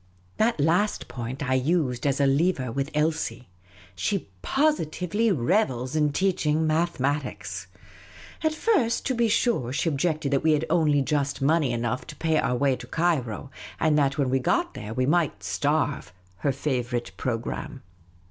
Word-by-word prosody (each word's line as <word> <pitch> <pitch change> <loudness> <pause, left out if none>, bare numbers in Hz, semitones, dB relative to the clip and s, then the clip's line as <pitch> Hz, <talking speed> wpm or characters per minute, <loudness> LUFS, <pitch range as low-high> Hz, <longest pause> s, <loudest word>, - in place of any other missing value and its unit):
That 225 -4 +2
last 175 +8 +1
point 125 +3 -5
I 130 - +1
used 130 -2 +1
as 140 0 +1
a 140 - +4
lever 135 -2 +1
with 140 +4 -2
Elsie. 150 - -1 0.5
She 180 - -2
posi 295 - +1
tively 195 +8 0
revels 130 - +1
in 150 -1 +2
teaching 160 -3 +1
mathematics. 155 -3 -1 0.8
At 315 0 +1
first, 310 - +1
to 260 - +1
be 235 -1 +2
sure, 215 - +1
she 145 +5 0
objected 155 0 -1
that 140 - +2
we 155 0 +3
had 150 +1 +1
only 150 -4 +3
just 140 -1 -1
money 145 -1 +2
enough 120 +1 -2
to - - -8
pay 160 -1 +1
our 125 - +1
way 135 +1 +2
to 120 0 -10
Cairo, 140 - -1 0.3
and 155 -2 +3
that 140 0 +1
when 135 -3 +1
we 135 - +2
got 125 - 0
there 105 - -7
we 130 0 +1
might 150 - +1
starve 140 +10 0 0.2
— 90 0 -32
her 140 - 0
favourite 125 -3 -2
programme. 125 +2 -4
145 Hz, 165 wpm, -26 LUFS, 130-165 Hz, 0.8 s, a